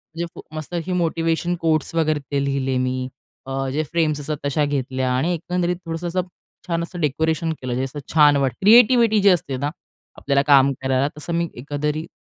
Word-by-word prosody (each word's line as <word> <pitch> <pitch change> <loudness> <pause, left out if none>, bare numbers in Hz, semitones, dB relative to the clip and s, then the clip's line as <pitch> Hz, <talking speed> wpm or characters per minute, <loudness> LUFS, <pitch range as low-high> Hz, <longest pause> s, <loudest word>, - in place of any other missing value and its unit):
म्हणजे 170 - -2 0.3
मस्त 155 +2 -7
असे 175 +2 -2
मोटिव्हेशन 165 0 0
कोट्स 160 -1 +1
वगैरे 155 -2 +1
ते 140 -1 0
लिहिले 135 -2 -1
मी. 130 0 -1 0.4
अ, 135 0 -3
जे 155 +2 0
फ्रेम्स 155 -3 +1
असतात 150 +1 -3
तशा 145 +1 +1
घेतल्या 130 -2 -1
आणि 155 +8 +1
एकंदरीत 180 +1 -1
थोडंसं 165 +1 -4
असं 185 +2 0 0.5
छान 170 -1 -1
असं 175 +1 -7
डेकोरेशन 160 +2 0
केलं 130 -1 -3
जे 130 - -1
असं 135 +2 -5
छान 150 -2 +6
वाटतं. 135 -3 0
क्रिएटिव्हिटी 230 +1 +6
जी 200 - +6
असते 160 -7 +1
ना 140 +3 -1 0.5
आपल्याला 140 -1 +1
काम 140 -1 +6
करायला 130 +1 +1
तसं 160 +3 -5
मी 170 0 0
एकंदरीत 150 +4 -3
150 Hz, 180 wpm, -21 LUFS, 135-170 Hz, 0.5 s, छान